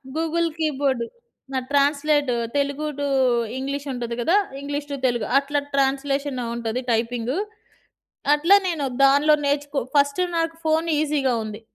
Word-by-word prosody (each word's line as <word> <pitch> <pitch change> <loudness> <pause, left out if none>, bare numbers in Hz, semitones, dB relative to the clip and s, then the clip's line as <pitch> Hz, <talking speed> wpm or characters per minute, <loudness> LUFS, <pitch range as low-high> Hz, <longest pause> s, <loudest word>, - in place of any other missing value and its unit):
Google 330 +1 0
keyboard. 275 -6 0 0.5
నా 260 - +1
translate 290 0 +2 0.3
Telugu 280 +2 -1
to 285 - -1 0.5
English 280 +2 -4
ఉంటది 235 -1 -4
గదా! 345 +11 +3 0.2
ఇంగ్లీష్ 285 +1 -4
టు - - -1
తెలుగు 240 -3 -1
అట్లా 285 +1 -1
ట్రాన్స్‌లేషన్‌లో 275 -1 0
ఉంటది 235 +1 -2
టైపింగు. 235 +5 -1 1.0
అట్లా 335 +7 +5
నేను 320 -5 -1 0.2
దానిలో 285 +3 +5
నేర్చుకో 285 0 -1 0.2
ఫస్ట్ 285 +3 +3 0.2
నాకు 330 0 0
ఫోన్ 320 +1 +2
ఈజీగా 290 -4 +1
ఉంది. 215 0 -7
280 Hz, 130 wpm, -23 LUFS, 265-300 Hz, 1.0 s, అట్లా